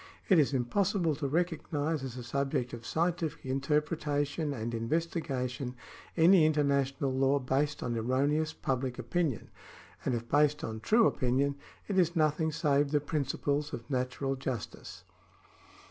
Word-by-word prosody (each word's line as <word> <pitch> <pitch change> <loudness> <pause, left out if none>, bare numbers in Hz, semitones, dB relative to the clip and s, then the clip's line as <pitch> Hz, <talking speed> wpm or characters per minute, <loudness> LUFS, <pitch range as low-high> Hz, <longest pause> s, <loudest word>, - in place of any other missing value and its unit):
It 185 -5 +6
is 145 - +3
impossible 170 - +1
to 145 - -2
recognise 160 -2 -1
as 130 -2 -6
a 125 - -6
subject 130 0 -1
of 115 -1 -7
scientific 170 -2 -1
interpretation 145 +2 0
and 120 -3 -4
investigation 130 -1 -2 0.4
any 170 +1 +7
international 140 -3 +1
law 135 +1 +3
based 140 +2 -1
on 120 -1 -2
erroneous 140 +7 +1
public 130 -4 -2
opinion; 160 - -2 0.5
and 125 - 0
if 115 0 -5
based 150 +2 +2
on 110 0 -4
true 220 - +4
opinion, 130 - +1 0.3
it 195 -2 +1
is 175 -1 +2
nothing 155 0 +2
save 145 -2 +2
the 150 0 +2
principles 145 0 -1
of 115 - -6
natural 130 +1 -1
justice. 130 -3 -6
140 Hz, 135 wpm, -31 LUFS, 130-155 Hz, 0.5 s, any